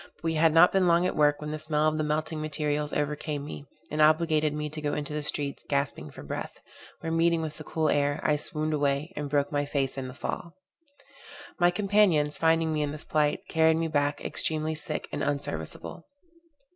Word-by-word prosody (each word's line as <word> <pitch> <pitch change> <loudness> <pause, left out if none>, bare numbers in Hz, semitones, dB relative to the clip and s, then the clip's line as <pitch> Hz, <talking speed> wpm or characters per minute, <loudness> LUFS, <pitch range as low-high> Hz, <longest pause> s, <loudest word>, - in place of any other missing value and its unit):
But - - -30
we 165 0 0
had 160 0 +4
not 165 +3 +7
been 190 -2 +3
long 170 +1 +4
at - - -1
work, 145 -1 +3
when 150 0 -5
the 155 - -4
smell 155 0 +1
of 155 0 0
the - - +1
melting 155 +1 -2
materials 150 0 -1
overcame 150 0 -2
me, 145 -1 -8 0.2
and 155 +1 0
obligated 155 0 +3
me 150 0 -3
to 155 +1 -5
go 145 -1 -1
into 150 0 -3
the 150 - -2
streets 145 -1 -2
gasping 140 0 -1
for - - -11
breath, - - -6 0.4
where 165 - -3
meeting 165 0 +3
with 155 0 -6
the - - -7
cool 160 0 -1
air, 145 0 +1
I 150 - +3
swooned 155 +1 -1
away, 145 +3 0
and 145 -1 -4
broke 145 0 +1
my 145 -1 0
face 140 -2 -1
in 130 - -5
the 130 - -9
fall. 170 +4 -5 1.0
My 175 0 +5
companions, 180 -6 +2
finding 165 0 +2
me 155 - 0
in 145 - 0
this 150 +1 -6
plight, 150 -1 +1
carried 160 0 +3
me 165 0 -1
back, 145 -1 0
extremely 155 0 0
sick 155 - -4
and 145 - -3
unserviceable. 140 - -4
150 Hz, 210 wpm, -28 LUFS, 145-160 Hz, 1.0 s, not